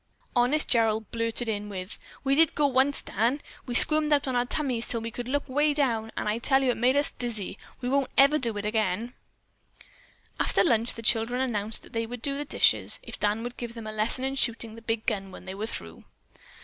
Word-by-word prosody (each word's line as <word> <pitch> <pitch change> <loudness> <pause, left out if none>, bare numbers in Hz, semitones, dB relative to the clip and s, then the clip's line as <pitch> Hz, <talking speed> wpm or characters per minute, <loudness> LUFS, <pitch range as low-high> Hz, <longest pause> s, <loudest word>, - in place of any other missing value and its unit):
Honest 250 +6 +2
Gerald 220 -2 +1
blurted 230 +1 -1
in 210 -1 -3
with, 185 0 -7 0.2
"We 270 0 +1
did 320 +2 +3
go 300 - +2
once, 270 +1 +2
Dan. 235 +8 0 0.3
We 245 - -3
squirmed 305 +3 +7
out 285 -2 +3
on 260 - -1
our 245 0 +1
tummies 250 -5 -1
till 235 - -1
we 230 +1 -5
could 245 +1 -6
look 285 +2 -2
'way 295 +2 +1
down, 230 -6 0
and - - -2
I 210 +2 0
tell 270 +2 +2
you 255 - +3
it - - -4
made 250 +3 +2
us 285 +1 +2
dizzy. 225 -6 -4 0.3
We 250 - -3
won't 275 -1 +1
ever 280 +2 +6
want 265 - -7
to 230 - 0
do - - -7
it 205 - -4
again." 215 +2 -1 1.3
After - - +2
lunch 235 -6 +1
the 230 - -8
children 225 +3 +2
announced 220 -4 -1
that - - -17
they 230 0 -2
would 245 0 -8
do 280 - +1
up - - -4
the 295 - -3
dishes - - +3
if - - -8
Dan 210 +2 0
would 245 0 -7
give 235 -1 -6
them 230 -2 -8
a 215 - -5
lesson 215 +4 +2
in 270 - -1
shooting 230 -4 -2
the 230 - -12
big 225 -1 -3
gun 195 -3 -2
when 185 - -12
they 190 - -6
were 210 +3 -4
through. 85 - -7
235 Hz, 240 wpm, -27 LUFS, 220-265 Hz, 1.3 s, squirmed